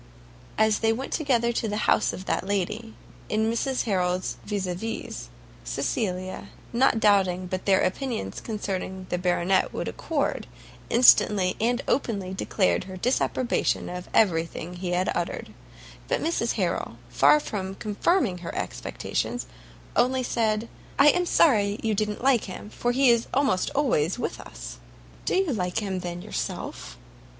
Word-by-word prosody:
As 220 -1 +3
they 225 0 +3
went 255 +4 -3
together 245 -6 +2
to 230 - -1
the 210 0 -2
house - - +3
of 185 - -8
that - - 0
lady, 205 +3 -2 0.3
in 220 +1 +1
Mrs 255 +3 0
Harrel's 185 -3 0
vis 200 -2 -2
a 180 - -2
vis, 225 +6 -5 0.3
Cecilia, 185 -2 -2 0.2
not 235 -1 +3
doubting 190 -4 +3
but 185 +2 -4
their 190 -1 +5
opinions 235 +4 -2
concerning 190 -3 -4
the 180 - 0
Baronet 180 +1 +2
would - - -4
accord, 300 -4 -2 0.4
instantly 210 -6 +5
and 240 +3 +1
openly 200 -8 -1
declared 190 -1 +1
her 185 0 -8
disapprobation 250 +3 0
of 180 0 -7
every 170 -7 +4
thing 170 +1 -7
he 180 0 -4
had 180 +1 +1
uttered; 175 -1 -3 0.5
but - - +1
Mrs 330 +2 0
Harrel, - - -2
far 300 - +5
from 195 -8 -4
confirming 210 - +1
her 170 - -6
expectations, - - -3 0.5
only 255 +1 +2
said, 220 -2 0 0.3
"I 280 +2 +7
am 360 +2 +2
sorry 210 -12 +4
you 220 -1 +1
don't 210 +2 -2
like 260 -4 +3
him, 205 +2 -8
for 240 - -1
he 260 0 +5
is 235 -1 +2
almost 265 -9 +2
always 235 - +2
with - - -3
us?" - - -9 0.5
"Do - - +1
you 370 -6 +2
like 180 -4 -2
him, 195 -4 -1
then, 175 0 -5
yourself?" - - -5
210 Hz, 150 wpm, -26 LUFS, 185-240 Hz, 0.5 s, I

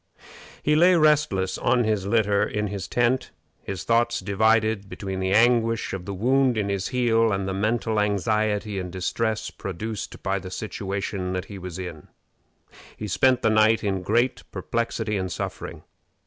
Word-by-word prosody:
He 150 - +3
lay 175 +3 +6
restless 150 - +2
on 120 0 +2
his 105 -3 0
litter 105 -2 +2
in 105 0 -2
his 100 -2 -5
tent, 120 +2 +1 0.3
his 95 -3 -5
thoughts 120 0 +2
divided 110 +1 +1
between 95 -2 -5
the 95 0 -1
anguish 115 0 +3
of 95 -2 -5
the 100 - -4
wound 130 +4 +2
in 100 -2 -1
his 100 -1 -1
heel 115 -3 +2
and 95 -1 -1
the 95 - -2
mental 110 +2 0
anxiety 105 0 0
and 90 -1 -5
distress 110 +4 -2
produced 105 +3 -6
by 100 0 0
the 95 0 -8
situation 100 -1 -4
that 90 -1 -3
he 100 -2 -9
was 90 -1 -7
in. 90 -5 -7 0.9
He 105 - -5
spent 130 +5 +2
the 110 - +4
night 110 +1 +4
in 95 -2 -1
great 120 +7 +1
perplexity 115 -2 -2
and 95 -1 -3
suffering. - - -5
105 Hz, 160 wpm, -24 LUFS, 95-115 Hz, 0.9 s, lay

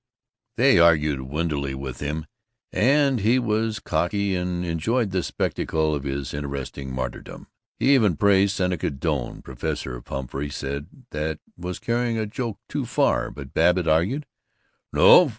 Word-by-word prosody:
They - - +5
argued 75 -5 +4
windily 70 0 -2
with 65 -1 -6
him, 75 +2 -3 0.5
and 135 +5 +3
he 110 +5 +3
was 110 -2 0
cocky, 95 +5 0
and 90 0 -2
enjoyed 100 +7 0
the 95 -1 +1
spectacle 80 -2 -1
of 70 -1 -3
his 70 -1 -3
interesting 70 -1 -5
martyrdom. 65 0 -5 0.3
He 140 - +4
even 105 - +4
praised 100 0 +4
Seneca 90 -4 0
Doane. 70 -2 -3
Professor 60 -1 -4
Pumphrey 70 +2 -4
said 70 +1 -4 0.2
that 75 0 -2 0.2
was 90 +1 -5
carrying 120 0 0
a 110 - 0
joke 115 0 -4
too - - -3
far; - - +2
but 70 -2 -10
Babbitt 90 +1 +3
argued, 95 - +2 0.7
"No! 175 -4 +7
85 Hz, 140 wpm, -24 LUFS, 70-105 Hz, 0.7 s, No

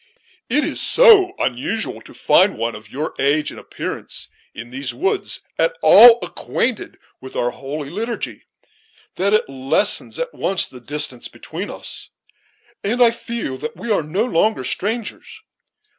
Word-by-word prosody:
It 300 - +2
is - - -2
so 420 -7 +6
unusual 125 -1 -2
to - - -14
find - - +3
one 115 0 -2
of 105 0 -11
your 150 +4 -4
age 145 +2 +1
and - - -10
appearance, - - -7 0.3
in 120 +1 -9
these 130 +1 -5
woods, 390 +3 -2 0.2
at - - +1
all 235 -1 +9
acquainted 240 -2 -2 0.2
with 130 0 -10
our 120 0 0
holy 140 +2 -7
liturgy, 230 +5 -4 0.7
that 200 +3 +2
it 215 - +1
lessens 135 0 +1
at - - -4
once 190 -3 0
the 125 - -13
distance 130 -2 -2
between - - -7
us, - - -7 0.7
and 225 +5 -1
I 240 -2 +6
feel 230 - -5
that 150 +4 -6
we 235 - -4
are 205 - +2
no 175 +9 -1
longer 215 - +1
strangers. 215 - -3
175 Hz, 150 wpm, -20 LUFS, -, 0.7 s, all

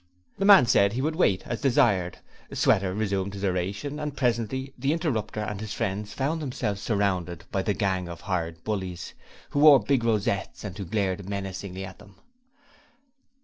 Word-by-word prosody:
The 195 - +1
man 200 -9 +9
said 100 -4 +4
he 125 - -1
would 155 +1 0
wait 100 - +2
as 120 - -4
desired; 100 - +2 0.3
Sweater 95 -1 +2
resumed 100 -1 -2
his 100 0 -3
oration, 100 +10 -2
and 150 -2 -4
presently 125 +2 -1
the 135 +4 0
interrupter 115 - -2
and 105 -1 -4
his 110 -1 -5
friends 105 -1 -2
found 155 +4 -1
themselves 105 -8 -3
surrounded 95 -6 -1
by 95 - 0
the 100 +1 -1
gang 95 -4 -1
of 85 0 -8
hired 85 -4 -3
bullies 95 -5 -4 0.4
who 145 - 0
wore 150 -1 +9
the - - -5
big 135 -4 +2
rosettes 105 -4 -1
and 100 -3 -6
who 100 -2 -5
glared 95 0 -2
menacingly 95 -1 -5
at 95 -1 -11
them. 100 -1 -16
100 Hz, 175 wpm, -26 LUFS, 95-125 Hz, 0.4 s, man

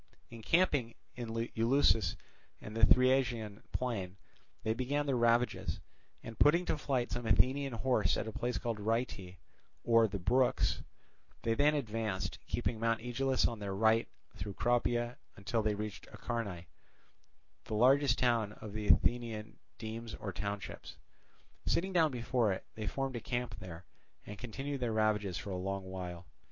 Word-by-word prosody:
Encamping 125 0 +1 0.2
in 120 -2 -5
Eleusis 115 - +2 0.4
and 105 - -9
the 115 - -1
Thriasian 120 -4 +4
plain, 100 -7 -3 0.5
they 110 -1 +1
began 135 +5 -1
their 140 -2 +1
ravages, 120 0 +2 0.4
and 115 -1 -9
putting 170 +5 +5
to - - +1
flight 130 -4 -1
some 120 -1 -3
Athenian 130 +5 +3
horse 110 -3 +2
at - - -3
a - - -3
place 120 +3 -2
called 115 -3 -3
Rheiti, 105 -4 -2 0.5
or 115 -1 +5
the 100 - -4
Brooks, 125 +8 +2 0.6
they 115 - +2
then 145 +5 +3
advanced, 110 -7 -2
keeping 115 - -1
Mount 115 0 +1
Aegaleus 130 +2 +1
on 115 - -5
their 100 -2 -3
right, 110 +2 +3 0.3
through 95 +2 -6
Cropia, 120 0 +1 0.2
until 105 +4 -1
they 105 -1 +1
reached 105 0 -6
Acharnae, 100 -8 -4 1.0
the 110 - -3
largest 130 +3 +4
of 110 -3 0
the 105 -1 -3
Athenian 115 -3 +2 0.2
demes 115 0 -6
or 100 -3 -5
townships. 100 +1 -5 0.7
Sitting 190 +3 +1
down 165 -3 +5
before 120 -3 +1
it, 95 - -4
they 110 -1 -5
formed 135 +3 -2
a - - -5
camp 120 -2 -3
there, 90 -3 -9 0.4
and 105 -1 -8
continued 135 +4 -4
their 120 -3 -1
ravages 105 -4 +1
for 90 +2 -5
a 90 - -2
long 95 +1 -3
while. 90 -2 -6
115 Hz, 150 wpm, -33 LUFS, 105-125 Hz, 1.0 s, putting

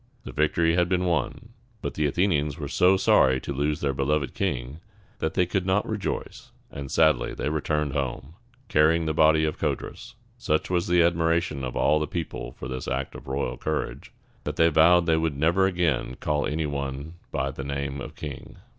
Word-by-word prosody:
The - - -7
victory 80 +2 +2
had 90 0 +2
been 90 0 +1
won; 90 +6 -1 0.3
but - - -3
the 75 -1 +1
Athenians 75 -3 +1
were 75 -3 -4
so 90 +6 +4
sorry 65 -7 +4
to - - -4
lose 75 +3 -1
their 70 -1 0
beloved 70 0 0
king, 65 +6 -3 0.4
that 80 - -2
they 90 - +3
could 95 +1 -1
not 95 +2 +1
rejoice, 105 -3 -4 0.2
and 70 -1 -7
sadly 75 -5 +3
returned 75 -1 -1
home, 65 +1 -3 0.3
carrying 80 +2 +3
the 80 - 0
body 80 0 +4
of 75 - -3
Codrus. - - -4 0.2
Such 75 +4 0
was 90 -1 +1
the 90 -1 +4
admiration 85 -3 +1
of 65 -1 -4
all 75 - +3
the 75 - -2
people 85 0 -5
for - - -8
this 65 -1 -5
act 65 +1 -2
of - - -11
royal 65 -2 -2
courage, 80 +3 -3 0.3
that - - -4
they 80 0 +4
vowed 85 +3 +5
they 80 -1 +3
would 80 -3 -1
never 85 +6 +3
again 85 -8 0
call 75 -1 0
any 80 +1 -1
one 70 +1 -4 0.2
by 70 +1 -1
the 70 0 -7
name 70 0 -3
of - - -8
king. 75 -3 -8
75 Hz, 190 wpm, -26 LUFS, 70-85 Hz, 0.4 s, vowed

